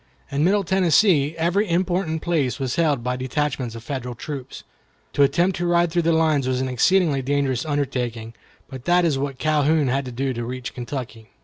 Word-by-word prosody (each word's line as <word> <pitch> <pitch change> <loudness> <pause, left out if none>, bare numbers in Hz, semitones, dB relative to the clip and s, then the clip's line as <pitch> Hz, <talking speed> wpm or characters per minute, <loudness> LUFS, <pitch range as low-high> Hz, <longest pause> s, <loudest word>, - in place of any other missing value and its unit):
In 140 +1 0
Middle 200 +4 +3
Tennessee 175 -4 +3
every 180 +5 +1
important 175 -2 0
place 145 -8 0
was 130 -2 -2
held 150 -7 +1
by 125 +1 -1
detachments 130 -2 -2
of 115 - -9
Federal 125 -1 -5
troops. 135 +1 -7 0.5
To - - +1
attempt 170 +7 +3
to 175 0 -1
ride 175 -1 +2
through 175 +1 +1
the 165 0 +2
lines 155 -4 +2
was 130 -1 0
an 130 - -1
exceedingly 145 +3 +2
dangerous 135 -1 0
undertaking, 125 -6 -2 0.3
but 130 -1 -10
that 175 0 +3
is 145 -5 +1
what 135 -1 -3
Calhoun 155 -1 +2
had 135 +2 0
to 125 - -6
do 130 +2 -2
to 120 0 -4
reach 125 +1 -5
Kentucky. 120 -3 -7
140 Hz, 190 wpm, -22 LUFS, 130-170 Hz, 0.5 s, Middle